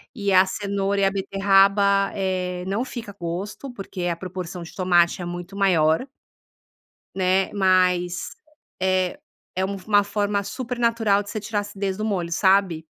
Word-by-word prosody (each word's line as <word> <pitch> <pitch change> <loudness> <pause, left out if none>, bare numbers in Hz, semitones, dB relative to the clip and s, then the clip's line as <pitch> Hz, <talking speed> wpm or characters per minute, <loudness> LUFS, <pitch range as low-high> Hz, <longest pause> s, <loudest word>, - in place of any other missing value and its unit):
e 200 -4 0
a 185 0 +7
cenoura 200 0 -1
e 195 - +4
a 195 - +2
beterraba, 195 0 +3
eh, 185 -2 -2
não 200 +5 -1
fica 225 -6 -8
gosto, 185 +10 -5
porque 190 -4 -6
a 170 - 0
proporção 180 -1 -6
de 165 - -11
tomate 175 -1 +2
é - - -4
muito 175 +2 -7
maior 175 - +3 1.1
né, 190 0 +1
mas 185 -2 +2 0.5
é 185 +4 +1 0.4
é 190 +1 0
um 200 - -4
uma 205 -1 +4
forma 205 0 -1
supernatural 230 -4 0
de 205 - -13
você 215 - -3
tirar 210 +1 -3
acidez 200 -1 -4
do 215 - -2
molho, 175 -5 -2
sabe. 190 -3 +2
195 Hz, 150 wpm, -23 LUFS, 180-200 Hz, 1.1 s, a